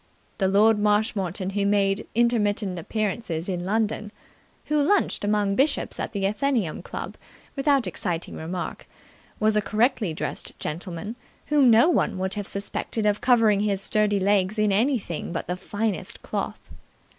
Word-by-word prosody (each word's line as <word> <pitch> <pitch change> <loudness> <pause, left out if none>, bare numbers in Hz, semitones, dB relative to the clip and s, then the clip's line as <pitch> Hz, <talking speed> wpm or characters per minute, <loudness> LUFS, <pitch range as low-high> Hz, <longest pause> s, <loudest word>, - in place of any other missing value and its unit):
The 190 - +2
Lord 210 +3 +4
Marshmoreton 205 -3 0
who 200 0 0
made 200 0 +1
intermittent 210 -5 +1
appearances 190 -3 -3
in 180 -2 -2
London, 215 +1 -1 0.5
who 300 -1 +1
lunched 390 - +2
among 205 -1 +1
bishops 275 +7 +1
at - - -3
the 200 -3 -2
Athenaeum 210 - 0
Club - - -7 0.4
without 275 -2 +2
exciting 175 -3 -2
remark, 170 +2 -5 0.5
was 215 0 +3
a 210 - +3
correctly 215 -2 +1
dressed 155 - -5
gentleman 175 +7 -5 0.3
whom 290 -4 +5
no 230 +6 +6
one 340 - +1
would 190 +1 -1
have 205 -1 -4
suspected 200 +2 -3
of 210 0 +1
covering 225 -5 +4
his 200 -2 0
sturdy 205 0 +1
legs 195 +1 +2
in 210 -1 +2
anything 215 - 0
but 170 - -3
the 180 - -2
finest 205 0 -3
cloth. - - -5
205 Hz, 145 wpm, -25 LUFS, 190-225 Hz, 0.5 s, no